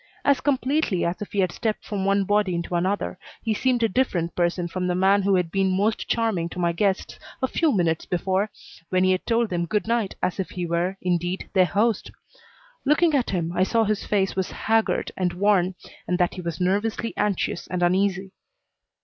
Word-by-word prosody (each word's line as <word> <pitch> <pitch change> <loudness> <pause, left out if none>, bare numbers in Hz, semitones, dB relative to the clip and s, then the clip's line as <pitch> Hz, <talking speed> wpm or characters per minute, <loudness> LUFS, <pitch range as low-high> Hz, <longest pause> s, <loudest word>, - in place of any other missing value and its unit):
As 280 -2 +3
completely 270 - +1
as 170 +3 -2
if 210 - -6
he 200 -3 +1
had 185 -2 +1
stepped 220 +2 -3
from 195 -2 -3
one 195 0 +3
body 205 -2 +1
into 170 +1 -4
another 185 +2 -1 0.2
he 220 - +1
seemed 245 +1 +1
a - - +5
different 185 -8 0
person 175 0 0
from 180 +1 -3
the 180 - 0
man 195 +2 +4
who 195 0 +2
had 180 -3 0
been 190 -1 +1
most 215 +3 0
charming 220 -8 0
to - - -10
my 170 -1 +2
guests 190 +2 -1 0.2
a 260 - +1
few 320 +3 +1
minutes 170 -7 0
before 190 +3 0 0.4
when 185 0 +2
he 185 - +4
had 185 - -1
told 230 -2 +1
them 170 -1 -1
good 210 +4 0
night 230 -4 0
as 185 - 0
if 190 - -2
he 180 -1 -4
were, 175 +3 -1
indeed, 175 +1 -1
their 185 -2 +5
host. 215 +4 +1 0.7
Looking 310 +3 +3
at 265 -4 +1
him, 170 -3 -1
I - - +1
saw 225 +4 +3
his 210 -1 -1
face 195 -2 0
was 190 -1 -1
haggard 225 0 0
and 180 -2 -1
worn 190 -1 +2 0.3
and 180 - +1
that 180 -1 +1
he 185 - -6
was 170 -2 -4
nervously 205 +5 0
anxious 205 -4 -1
and 180 0 -2
uneasy. 190 +1 +1
190 Hz, 205 wpm, -24 LUFS, 180-215 Hz, 0.7 s, a